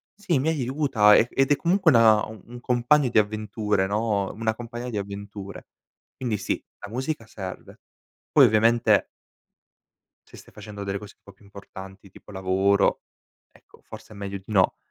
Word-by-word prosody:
sì, 190 -8 -1
mi 140 - -1
aiuta 130 -7 +3
e 115 - +4
ed 135 +1 +1
è 145 - +6
comunque 175 +1 +2
una 110 -3 +5
un 110 +3 -11
compagno 125 +3 +2
di 115 - +4
avventure, 105 -1 -1
no, 105 -1 -1
una 110 0 -2
compagna 120 +1 -7
di 110 - -4
avventure. 100 0 -8 0.5
Quindi 120 -5 -2
sì, 95 - -3 0.2
la 105 - -7
musica 130 -1 -4
serve, 95 -4 -9 0.5
poi - - +7
ovviamente 115 +2 +3 1.2
se - - -14
stai - - -16
facendo 105 -1 -9
delle 100 0 -3
cose 105 0 -11
un - - -54
po' 100 - -14
più 100 +2 -23
importanti, 100 -1 -12
tipo 100 - -16
lavoro, 95 +1 +1 0.5
ecco, - - -23
forse - - -12
è - - -11
meglio 100 0 -5
di 95 - -16
no 100 -4 +2
110 Hz, 165 wpm, -24 LUFS, 100-120 Hz, 1.2 s, poi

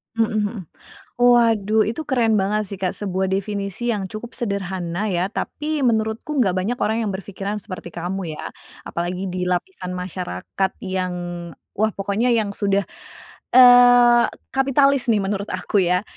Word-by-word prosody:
Heeh 225 -1 +2 0.2
heeh. 205 0 -5 0.6
Waduh, 225 -3 +4
itu 240 +8 -4
keren 235 -4 +2
banget 210 +2 0
sih 200 - -6
Kak, 185 - 0
sebuah 190 -2 -2
definisi 200 +3 -2
yang 200 -2 -3
cukup 215 +5 -8
sederhana 195 -3 -3
ya, 180 0 0
tapi 300 0 -3
menurutku 225 +4 0
nggak 195 -7 +3
banyak 220 +7 -1
orang 220 +2 +1
yang 210 - -1
berpikiran 200 +2 -5
seperti 185 -4 -8
kamu 175 -1 -5
ya. - - -7 0.4
Apalagi 180 +2 -3
di 185 - -3
lapisan 180 - -3
masyarakat 180 - -3
yang 185 -2 -2 0.6
wah 215 +2 +1
pokoknya 200 +5 0
yang 220 -3 +1
sudah, 200 -2 0 0.7
eee, 245 -1 +8 0.3
kapitalis 275 0 +3
nih 210 -3 +2
menurut 200 +1 -2
aku 185 +3 -1
ya. 180 +1 +2
205 Hz, 145 wpm, -21 LUFS, 185-235 Hz, 0.7 s, eee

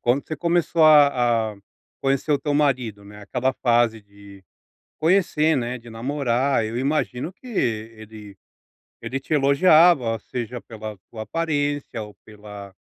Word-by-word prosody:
quando 125 +4 0
você 155 - -5
começou 170 0 +1
a 125 -7 +4
a - - -19 0.5
conhecer 135 +2 0
o 145 - +2
teu 145 +2 -2
marido, 130 -8 0
né, 105 +1 -13
aquela 125 +5 -1
fase 120 -2 +2
de 100 -1 -16 0.6
conhecer, 160 -3 +2
né, 125 0 -3
de 120 0 -15
namorar, 125 0 -1
eu 110 +2 -5
imagino 135 +2 -2
que 195 - -19
ele 110 - -5 0.7
ele 130 +4 -4
te 145 - -3
elogiava 140 -4 +4
seja 120 0 -6
pela 110 -2 -9
tua 110 - -7
aparência 145 -2 -2
ou 105 -1 -10
pela 105 -2 -11
125 Hz, 140 wpm, -23 LUFS, 110-145 Hz, 0.7 s, a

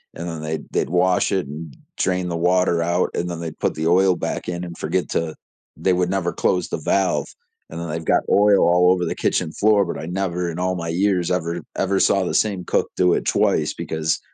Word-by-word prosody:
and 85 +1 -6
then 80 -2 -6
they 80 0 -2
they'd - - 0
wash 90 +2 +2
it 95 -7 0
and 75 0 -8 0.2
drain 90 -1 0
the 85 - -2
water 90 0 +2
out, 85 +2 +1
and 90 - -1
then 85 -1 -5
they 85 -1 -4
put - - -2
the 80 +1 -1
oil 90 +1 +4
back - - -4
in 85 0 -3
and 85 -1 -8
forget 90 +4 -2
to 80 -1 -2 0.4
they 95 - +1
would 90 0 +1
never 90 -3 0
close 90 -2 0
the - - -2
valve, 95 +4 0 0.4
and 80 - -6
then 85 - -4
they've 80 +1 -4
got - - +3
oil 100 0 +5
all 90 +1 +5
over 90 -1 +1
the - - -2
kitchen 80 - 0
floor, 105 +1 +3
but - - -5
I - - -6
never 90 -1 -2
in 85 - -6
all 90 0 0
my 85 -1 -4
years 90 0 +1
ever 85 -1 -1
ever 95 0 +1
saw 100 -1 +3
the - - -2
same 100 -4 +1
cook - - 0
do 90 -1 +3
it - - -2
twice - - +1
because 80 -1 -2
90 Hz, 230 wpm, -21 LUFS, 85-95 Hz, 0.4 s, oil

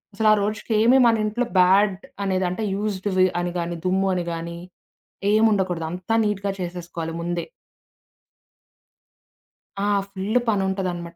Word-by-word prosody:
అసలు 220 0 +3
ఆ - - +5
రోజుకేమి 220 +4 +2
మనింట్లో 225 +1 +1
బ్యాడ్ 190 +2 +5 0.3
అనేది 190 -1 0
అంటే 215 +5 -3
యూజ్డ్‌వి 195 -2 +1
అని 175 0 -3
గాని, 170 0 -3
దుమ్ము 190 +1 +1
అని 175 - -2
గాని, 170 +1 -5 0.7
ఏముండకూడదు. 195 -6 +2
అంత 180 +4 -6
నీట్‌గా 200 -1 -1
చేసేసుకోవాలి 170 -2 -5
ముందే. 175 0 -3 2.4
ఆ! - - +1 0.2
ఫుల్ 200 +5 -1
పని 205 -3 +2
ఉంటదనమాట. 175 -3 -3
190 Hz, 120 wpm, -23 LUFS, 175-210 Hz, 2.4 s, ఆ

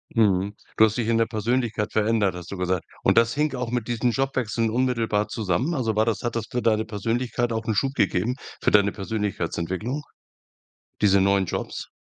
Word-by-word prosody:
Mhm. 100 -3 +3 0.2
Du 110 - +8
hast 110 +2 -1
dich 115 - -1
in 115 0 +2
der 115 - +3
Persönlichkeit 115 -1 -1
verändert, 105 -4 +2
hast 90 0 -8
du 100 - -5
gesagt. 90 -1 -1 0.2
Und - - +3
das 115 0 +5
hing 150 -1 0
auch 125 -2 -3
mit 120 -3 -2
diesen 120 0 +1
Jobwechseln 125 -4 0
unmittelbar 115 -3 +1
zusammen? 110 - -1
Also, 115 -7 -1
war 110 +1 +3
das 115 - -1
hat 120 -1 -2
das 115 -2 -2
für 125 - -2
deine 110 -1 +2
Persönlichkeit 120 +3 -1
auch 110 0 -3
'n 110 -2 0
Schub 135 +6 +1
gegeben, 115 +5 +1 0.3
für - - +2
deine 100 -1 +5
Persönlichkeitsentwicklung, 105 - -3 1.0
diese 100 -2 +5
neuen 100 0 +3
Jobs? - - -4
110 Hz, 190 wpm, -24 LUFS, 100-120 Hz, 1.0 s, Du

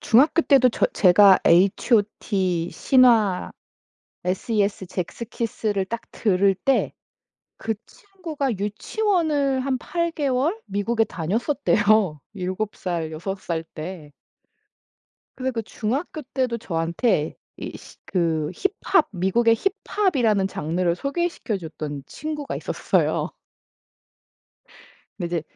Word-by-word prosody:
중학교 280 +8 +4
때도 270 -4 +5
저 230 - +1
제가 190 +1 +6
HOT, 190 -2 +2
신화, 230 -8 +3 0.7
SES, 200 +1 0
젝스키스를 210 +2 -3
딱 230 +3 -4
들을 195 -2 +2
때 270 +8 +1 0.7
그 225 0 0
친구가 330 - -5
유치원을 285 - 0
한 260 0 -1
8개월 320 - -1
미국에 225 +3 0
다녔었대요. 210 - +1
7 190 +2 -3
살, 170 -3 -3
6 190 +5 -5
살 165 -3 -3
때. 155 -2 -7 1.3
그래서 260 0 -2
그 230 -2 -2
중학교 255 - -3
때도 255 -3 0
저한테 165 -1 0 0.2
이 - - -6
시 - - -15
그 160 -4 0
힙합 390 -3 +1
미국의 205 +5 +3 0.3
힙합이라는 240 - +2
장르를 170 +1 -1
소개시켜줬던 190 - -3
친구가 300 - -5
있었어요. - - 0 1.9
근데 175 - -2
이제 - - -5
215 Hz, 215 characters per minute, -23 LUFS, 180-265 Hz, 1.9 s, 제가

